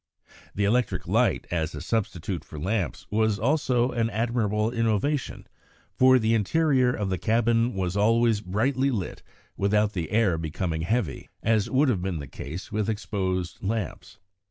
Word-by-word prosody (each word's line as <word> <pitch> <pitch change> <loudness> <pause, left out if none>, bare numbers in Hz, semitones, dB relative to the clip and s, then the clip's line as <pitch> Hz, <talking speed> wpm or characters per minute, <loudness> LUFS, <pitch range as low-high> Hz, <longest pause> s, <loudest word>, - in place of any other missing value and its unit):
The 100 - 0
electric 120 +4 0
light - - +2
as 80 -2 -1
a - - -5
substitute 95 -6 -2
for 80 - -11
lamps 90 - -2
was 110 -1 +2
also 125 +1 +1
an 115 -2 0
admirable 110 -1 0
innovation, 115 +4 -1 0.5
for 130 0 +6
the 115 -2 +1
interior 130 +3 +2
of 105 -5 -2
the 95 - -1
cabin 115 +1 +2
was 95 -1 -2
always 115 +1 +3
brightly 130 +8 0
lit 105 -9 -3 0.4
without 105 +1 +2
the 85 -4 -3
air 105 -7 +2
becoming 80 +1 -3
heavy, 90 - -2
as 110 -2 +2
would 140 +3 +3
have 100 -8 0
been 90 -2 -2
the 70 - -6
case 80 +6 -8
with 105 0 -1
exposed 95 -4 -2
lamps. 105 -2 -4
105 Hz, 155 wpm, -26 LUFS, 95-120 Hz, 0.5 s, for